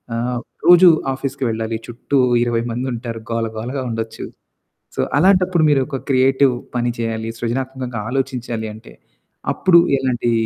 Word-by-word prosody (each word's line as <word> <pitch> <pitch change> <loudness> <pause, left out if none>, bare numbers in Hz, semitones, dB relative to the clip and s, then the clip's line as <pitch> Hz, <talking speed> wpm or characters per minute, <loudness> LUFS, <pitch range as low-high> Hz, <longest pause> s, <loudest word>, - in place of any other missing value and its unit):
ఆహ్, 120 +1 -2 0.3
రోజూ 175 +1 +8 0.3
ఆఫీస్‌కి 135 0 -4
వెళ్ళాలి, 110 0 -2
చుట్టూ 120 +4 -2 0.3
20 120 -1 0
మందుంటారు, 120 -1 -4
గోల 115 0 0
గోలగా 125 +5 -4
ఉండొచ్చు. 115 -1 -5 0.7
సో, - - -3 0.2
అలాంటప్పుడు 180 0 +3
మీరొక 135 -1 +1
క్రియేటివ్ 130 0 +3 0.2
పని 120 0 0
చెయ్యాలి, 115 -1 -3
సృజనాత్మకంగా 125 -1 -3
ఆలోచించాలి 125 -4 -3
అంటే, 110 - -14 0.6
అప్పుడు 170 -2 +5 0.2
ఎలాంటీ 120 -2 0
125 Hz, 120 wpm, -19 LUFS, 115-135 Hz, 0.7 s, రోజూ